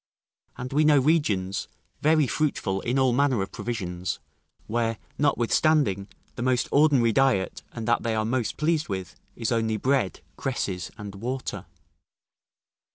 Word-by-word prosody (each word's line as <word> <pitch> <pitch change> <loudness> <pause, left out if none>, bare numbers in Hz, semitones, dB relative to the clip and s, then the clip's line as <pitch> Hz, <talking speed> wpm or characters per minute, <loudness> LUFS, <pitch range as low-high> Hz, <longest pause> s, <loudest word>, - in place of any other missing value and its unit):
And 125 +2 -5
we 150 +2 +4
know 150 -1 +6
regions, 125 - +1 0.3
very 155 -1 +4
fruitful 115 -9 -1
in 125 +3 -1
all 130 -2 +3
manner 130 -5 +2
of 95 - -7
provisions, 90 -6 -3 0.5
where, 115 0 -1 0.2
notwithstanding, 135 - +2 0.3
the - - -5
most 125 0 +1
ordinary 140 -6 +4
diet, 130 -6 +2
and 115 -1 -6
that 120 - +3
they 115 -1 -1
are 110 0 0
most 120 0 -1
pleased 155 -1 +1
with, 95 -3 -4 0.2
is 115 -2 -2
only 110 -2 +1
bread, 130 -6 0 0.2
cresses, 95 -9 -2
and 105 -3 -7
water. 125 +6 -4
120 Hz, 140 wpm, -26 LUFS, 105-140 Hz, 0.5 s, know